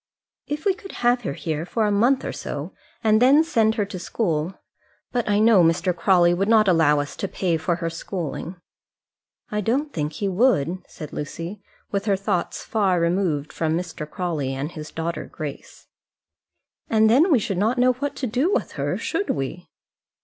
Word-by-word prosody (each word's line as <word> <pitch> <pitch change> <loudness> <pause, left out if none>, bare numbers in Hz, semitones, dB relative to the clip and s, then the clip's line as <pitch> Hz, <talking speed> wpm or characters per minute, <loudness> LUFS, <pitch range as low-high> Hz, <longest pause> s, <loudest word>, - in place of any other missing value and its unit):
"If 295 +5 -4
we 395 - +4
could 390 0 -11
have 245 +1 +4
her 175 - -3
here 155 +1 -3
for 215 +5 0
a 210 - +1
month 245 +7 +3
or - - -3
so - - -5 0.3
and 215 0 +4
then 280 +5 +6
send 225 -8 +2
her 205 - 0
to 195 -2 -7
school; 175 -3 -1 0.6
but 240 -3 -1
I 205 - +3
know 215 -4 +6
Mr. 170 +2 +2
Crawley 175 0 +4
would 195 +3 0
not 220 -2 +5
allow 160 -5 +4
us 145 0 -4
to 195 - -2
pay 180 -3 -1
for 165 +2 0
her 165 0 -3
schooling." 170 0 -5 1.0
"I 210 0 0
don't 275 +8 0
think 150 0 -2
he 200 - -2
would," 185 - +2
said 155 -4 -9
Lucy, 165 +7 -6 0.3
with 200 0 -1
her 200 -3 +2
thoughts 180 -3 -2
far 195 -5 +1
removed 170 -4 0
from 160 0 0
Mr. 170 -4 -5
Crawley 155 -8 -2
and 140 +4 -4
his 155 -2 -8
daughter 165 +1 -4
Grace. 150 -3 -8 1.0
"And 220 -1 +4
then 285 - +5
we 280 - +6
should 195 -4 -2
not 225 +5 +1
know 250 +1 +4
what 285 +3 -4
to 265 - -3
do 255 - +1
with 445 - 0
her; - - -2
should 400 - -2
we?" 155 +5 -3
190 Hz, 185 wpm, -23 LUFS, 165-225 Hz, 1.0 s, then